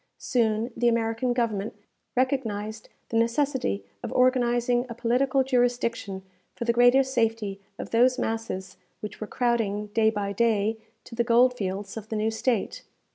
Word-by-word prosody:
Soon 225 0 0
the 240 - +1
American 230 +1 +1
Government 225 -4 -1 0.4
recognized 220 -5 -1 0.2
the 225 - 0
necessity 235 - 0 0.2
of - - -5
organizing 245 -1 +2
a 235 - -6
political 255 +3 +2
jurisdiction 245 -6 0 0.3
for 235 - -4
the 235 - +2
greater 245 +3 +6
safety 225 -6 -1 0.2
of - - -7
those 250 +3 +4
masses 225 -6 -3 0.2
which 210 0 -7
were 215 - -4
crowding, 210 -4 -1
day 225 -1 +4
by 205 -2 -2
day, 220 0 +1 0.3
to - - -13
the 235 +1 +1
gold 245 +2 +4
fields 195 -1 -4
of 220 0 -8
the 220 - -3
new 215 +1 0
State. 225 -1 -1
230 Hz, 150 wpm, -26 LUFS, 215-245 Hz, 0.4 s, greater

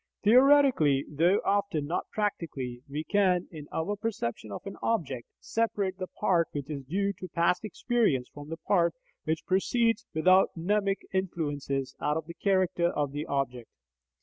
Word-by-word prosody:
Theoretically, 250 - +5
though 170 +7 +2
often 200 -7 +1
not 165 - -3
practically, 145 - -3
we 150 +2 -3
can, 185 -2 +2
in 150 -3 -9
our 190 +6 -1
perception 200 - -4
of 100 - -7
an 195 - -6
object, 140 - -1
separate 200 -4 -1
the 185 - -3
part 180 -5 +1
which 145 0 -4
is 140 -2 -4
due 200 +7 0
to 185 - -6
past 170 +3 +1
experience 215 - 0
from 145 0 -10
the 165 - -4
part 170 +2 +1 0.3
which 160 0 -1
proceeds 230 +4 +1
without 185 +4 +4
mnemic 195 +3 0
influences 145 -7 -2
out 150 +1 +1
of 160 - -4
the 170 - -8
character 185 -2 +1
of 145 -5 -1
the 145 +2 -4
object. 125 -4 -2
170 Hz, 155 wpm, -29 LUFS, 145-200 Hz, 0.3 s, Theoretically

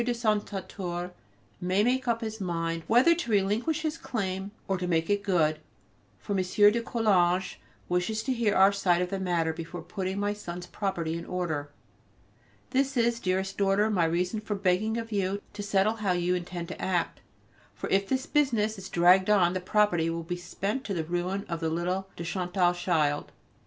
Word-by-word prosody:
de 240 0 0
Saint 215 -3 0
Satur 180 -3 -5 0.5
may 185 +3 +2
make 250 +2 +1
up 230 -1 +1
his 220 -1 -5
mind 165 -2 -2
either 250 +9 +6
to 335 -7 -4
relinquish 220 +10 +1
his 315 +1 -2
claim 190 -7 -3 0.2
or 195 - +1
to 180 -1 -3
make 165 +1 +1
it 205 0 +2
good: 165 -6 +1 0.6
for 205 - -4
M. - - +1
de 205 +5 +4
Coulanges 190 -6 +1 0.3
wishes 180 +5 0
to 265 - 0
hear 230 -4 +1
our 195 +1 +6
side 180 -3 +2
of 180 - -5
the 195 - -2
matter 170 -3 0
before 165 +2 -7
putting 190 -1 -3
my 205 0 0
son's 175 -4 -7
property 175 -5 -2
in - - -7
order. 160 -6 -2 1.0
This 270 0 +1
is, 235 0 +2
dearest 190 -1 -1
daughter, 200 +2 +3
my 180 -5 +2
reason 180 +6 0
for 210 -1 -3
begging 200 +3 +1
of 230 0 -5
you 200 -1 0
to 205 - -6
settle 205 +2 +1
how 200 -4 +1
you 175 0 +1
intend 175 -1 -4
to - - -7
act, 180 -3 -1 0.6
for - - -5
if 195 0 +2
this 265 0 0
business 225 -8 +1
is 190 0 -8
dragged 180 +3 +5
on, 185 -4 +4
the 185 - -2
property 180 -4 +2
will 165 0 -3
be 175 +2 -3
spent 195 +7 -3
to 200 - -3
the 165 - -1
ruin 175 +4 -2
of 170 -1 -3
the 165 -1 -1
little 180 +4 -2
de 170 - -6
Chantal 180 0 +1
child. 160 -5 0
190 Hz, 190 wpm, -28 LUFS, 175-210 Hz, 1.0 s, either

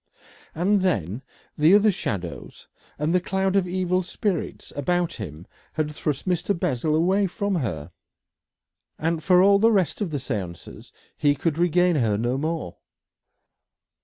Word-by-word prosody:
And 190 +5 +2
then 115 - -1 0.3
the 155 +6 +5
other 210 +1 +5
shadows 95 - -5 0.3
and 150 +3 0
the 180 - +3
cloud 190 +1 0
of 190 -2 +2
evil 185 0 0
spirits 185 0 -3
about 175 +4 0
him 85 -5 -8 0.3
had 150 -1 -2
thrust 150 +1 -3
Mr. 180 +1 0
Bessel 155 -2 0
away 190 +5 +2
from 200 +2 -2
her, 90 - -4 1.1
and 165 0 -1
for 180 +2 +5
all 200 0 +5
the 225 +2 +5
rest 185 -4 +1
of 200 - -1
the 150 - -2
séance 100 -10 -6 0.2
he 145 -1 +2
could 160 +2 -1
regain 175 0 +3
her 110 -6 +1
no 120 +4 -1
more. 155 - -3
165 Hz, 145 wpm, -24 LUFS, 135-185 Hz, 1.1 s, the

